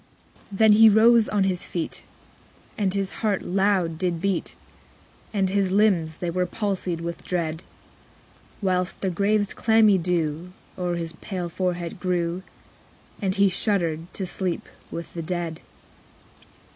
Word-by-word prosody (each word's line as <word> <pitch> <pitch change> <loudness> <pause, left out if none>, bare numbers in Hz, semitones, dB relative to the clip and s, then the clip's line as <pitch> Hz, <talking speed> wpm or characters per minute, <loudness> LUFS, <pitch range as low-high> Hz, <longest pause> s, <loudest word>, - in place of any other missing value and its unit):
10. 195 - -7
Then 220 0 +6
he 220 +1 +8
rose 225 +1 +5
on 205 -2 +2
his 185 -2 0
feet, 170 -2 -4 0.7
And 200 -3 0
his 195 -1 -1
heart 210 -4 0
loud 190 -4 +1
did 175 -2 -1
beat, 195 0 -1 0.8
And 195 -3 +1
his 195 -1 +1
limbs 185 -6 +2
they 175 -1 -3
were 180 +1 0
palsied 185 -4 -2
with 170 0 -5
dread; 165 -3 -2
_55 - - -19 1.0
Whilst 185 -1 0
the 190 - 0
grave's 205 +3 +1
clammy 220 -3 +4
dew 170 0 -1 0.2
O'er 180 -1 -2
his 165 -1 -4
pale 180 -3 -4
forehead 175 -1 -3
grew; 175 -1 -1 0.8
And 190 -2 0
he 200 0 +5
shuddered 175 -4 -1
to 190 - -3
sleep 180 -1 -3 0.2
with 170 - -7
the 170 - -4
dead. 170 -1 -3
185 Hz, 145 wpm, -24 LUFS, 170-200 Hz, 1.0 s, he